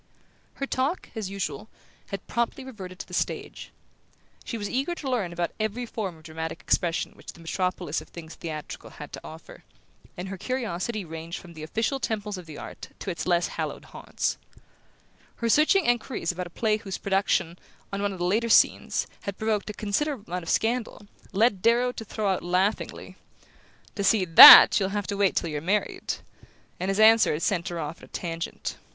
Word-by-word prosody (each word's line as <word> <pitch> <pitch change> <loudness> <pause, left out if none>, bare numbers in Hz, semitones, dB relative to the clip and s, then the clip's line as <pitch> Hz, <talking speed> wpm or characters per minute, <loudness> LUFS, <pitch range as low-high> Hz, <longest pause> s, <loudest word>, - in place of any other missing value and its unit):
Her 275 - -3
talk, 275 +6 -2
as 215 -4 -4
usual, 195 -2 -4 0.4
had 195 -2 -6
promptly 235 +3 -2
reverted 195 -8 -9
to - - -8
the - - -13
stage. - - -3 0.7
She 230 - -5
was 205 -2 -4
eager 275 +10 -1
to 295 - -7
learn 230 -9 -1
about 170 0 -2
every 220 +3 -2
form 200 -7 -5
of 160 - -19
dramatic 160 0 -5
expression 170 -1 0
which - - -11
the - - -17
metropolis 175 -1 -2
of - - -14
things 165 -1 -10
theatrical 155 -3 -7
had - - -11
to - - -7
offer, - - -12 0.5
and 180 +2 -5
her 195 -1 -7
curiosity 225 -4 -3
ranged 165 +1 -7
from 170 - -13
the 160 - -10
official 225 - -1
temples 210 -4 -3
of 175 - -12
the 150 -2 -9
art - - -9
to 195 - -4
its 170 - -5
less 175 -1 +2
hallowed - - -5
haunts. - - -3 1.0
Her 235 - -2
searching 310 - +4
enquiries 240 -7 0
about 180 +1 -5
a - - -13
play 215 +4 0
whose 200 -4 -6
production, 190 -3 0 0.3
on 200 - -2
one 205 0 0
of 190 - -7
the 175 - -2
latter 220 +6 +1
scenes, - - +3 0.2
had 200 -1 -4
provoked 215 -1 -1
a - - -4
considerable 225 +5 -2
amount 180 +1 -4
of 165 - -8
scandal, 225 -2 -1 0.3
led 200 -1 +2
Darrow 240 +3 +3
to 230 - -7
throw 215 0 -3
out 190 - 0
laughingly: 185 +4 -1 0.8
"To 200 - -3
see 195 -1 +3
THAT 165 +4 +11
you'll 190 -1 0
have 205 - -2
to 200 - -3
wait 200 -2 +2
till 165 - -1
you're 150 -1 -3
married!" 200 +6 -1 0.6
and 185 - -2
his 195 +1 0
answer 220 -2 +6
had 150 - -3
sent 185 -3 0
her 175 -2 -4
off 155 +1 -5
at - - -13
a - - -19
tangent. 165 -1 -5
195 Hz, 195 wpm, -26 LUFS, 175-225 Hz, 1.0 s, THAT